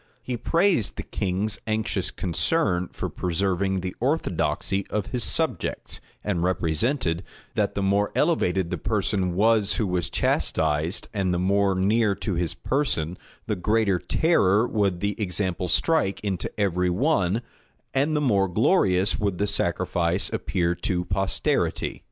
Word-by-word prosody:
He 125 - -3
praised 165 - +1
the - - -5
king's 100 +2 -2
anxious 110 -3 -1
concern 90 - 0
for - - -4
preserving 95 +1 -1
the 90 0 -5
orthodoxy 105 - 0
of 105 -2 -2
his 125 -3 -1
subjects; 155 - -1 0.2
and 95 -5 -1
represented, 85 - 0 0.3
that - - 0
the 100 - -1
more 100 +1 +2
elevated 95 - +1
the - - -2
person 90 -3 0
was 110 0 +3
who 110 - 0
was 90 -5 -1
chastised, 80 +4 0
and 95 -3 0
the 90 - +1
more 100 +2 +2
near 100 +2 +2
to 100 +1 -3
his 85 -1 -1
person, 90 - -1 0.3
the 105 - -1
greater 100 0 +1
terror 115 - +2
would 100 -6 0
the 100 0 0
example 90 -2 -1
strike 100 - +2
into 95 -3 -3
every 90 -2 +1
one, 100 - +1 0.5
and 145 +4 +1
the 150 - +1
more 100 -8 +3
glorious 95 - +2
would 100 -4 -1
the 100 - +1
sacrifice 90 -2 0
appear 85 -2 0
to 90 +1 -2
posterity. 95 0 0
95 Hz, 140 wpm, -25 LUFS, 90-110 Hz, 0.5 s, was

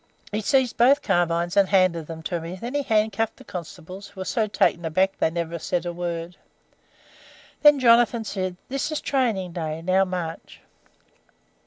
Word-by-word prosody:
"He 210 +1 -1
seized 260 +2 +1
both 265 +5 +5
carbines 175 -2 +1
and 200 -2 +4
handed 185 -5 +2
them 160 -1 -8
to 170 0 -3
me; 165 +2 -6
then 235 +7 -6
he 290 - +1
handcuffed 220 -2 0
the - - -14
constables, 180 +2 -8
who 200 - -15
were - - -4
so 220 +3 0
taken 175 -4 +1
aback 185 +4 0
they - - +3
never 170 0 -4
said 175 +2 -2
a 175 - -3
word. 170 0 -5 1.2
Then 295 -1 +7
Jonathan 235 -1 +4
said, 185 -4 -3
'This 275 +4 -2
is 305 - -1
training 225 -10 0
day. 160 -2 -4
Now, 185 +2 +3
march.' 180 -3 -5
185 Hz, 170 wpm, -24 LUFS, 170-225 Hz, 1.2 s, Then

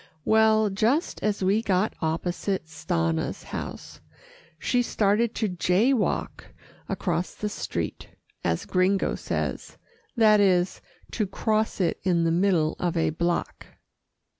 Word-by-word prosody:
Well, 220 -1 +4
just 230 - 0
as 210 -2 -1
we 200 +4 +3
got 195 -1 +1
opposite 175 +3 -2
Stanna's 80 - -2
house, - - -7 0.6
she 245 +9 +1
started 220 0 +1
to 220 - 0
"jay 185 +7 +2
walk" 235 - -1 0.4
across 175 -1 -2
the 210 - -3
street, - - -4 0.4
as - - -1
Gringo 190 +1 +1
says - - -4 0.4
that 215 -2 +6
is, 185 -2 +2 0.3
to 215 - -1
cross 215 +3 -1
it 175 -4 0
in 175 -3 +2
the 165 - +2
middle 170 -3 +2
of 175 -1 -1
a 160 - +2
block. 170 +2 -2
195 Hz, 125 wpm, -26 LUFS, 175-215 Hz, 0.6 s, that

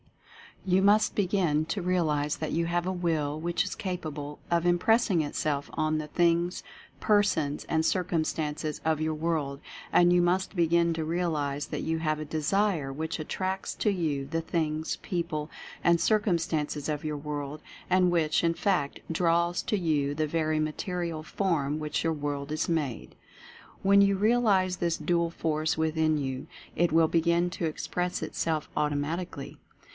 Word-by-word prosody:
You 185 0 +3
must 210 +2 +4
begin 180 -6 +1
to 180 +5 -3
realize 155 -5 0
that 155 - -3
you 170 0 +1
have 175 0 0
a - - +1
WILL 160 -5 -1
which 170 +1 0
is - - -4
capable 155 -6 -5
of 170 0 +1
impressing 185 +1 +3
it 145 - -4
self 145 -2 -1
on 155 0 0
the 155 -1 -4
things, 170 +2 +1 0.4
persons 185 -9 +1
and 160 0 0
circumstances 155 -4 -1
of 155 -1 +1
your 155 0 0
world 155 -3 -2 0.2
— - - -16
and 175 0 +6
you 175 0 +5
must 185 +3 +1
begin 170 0 +3
to 160 -1 -2
realize 155 -4 -1
that - - -4
you 160 0 -1
have 155 -1 0
a 155 - -4
DESIRE 160 0 0
which 160 +3 -3
attracts 190 +4 -3
to 210 - +1
you 155 -7 -1
the 165 +4 -2
things, 160 -1 -2
people 160 -5 -3 0.3
and 170 0 +4
circumstances 165 -8 0
of 150 0 -3
your 150 -1 -2
world, 145 0 -5 0.3
and 180 -1 +4
which, 160 -2 +2
in 165 0 +3
fact, 175 -9 0
draws 170 +1 +1
to 210 - 0
you 150 -6 0
the 155 0 0
very 155 0 0
material 165 +1 -2
from 155 -5 -1
which 150 -1 -2
your 165 0 +1
world 145 -1 -4
is 155 +2 -1
made. 150 -8 -2 0.7
When 200 +1 +6
you 200 0 +4
realize 200 -4 +3
this 170 -1 0
dual 170 -1 +1
force 155 -1 -1
within 160 -1 +1
you, 135 -2 -3 0.3
it 175 +1 +2
will 160 0 +5
begin 170 +2 +2
to 175 - -3
express 180 +3 -2
itself 155 -2 -2
automatically. 150 +1 -2
165 Hz, 160 wpm, -28 LUFS, 150-175 Hz, 0.7 s, and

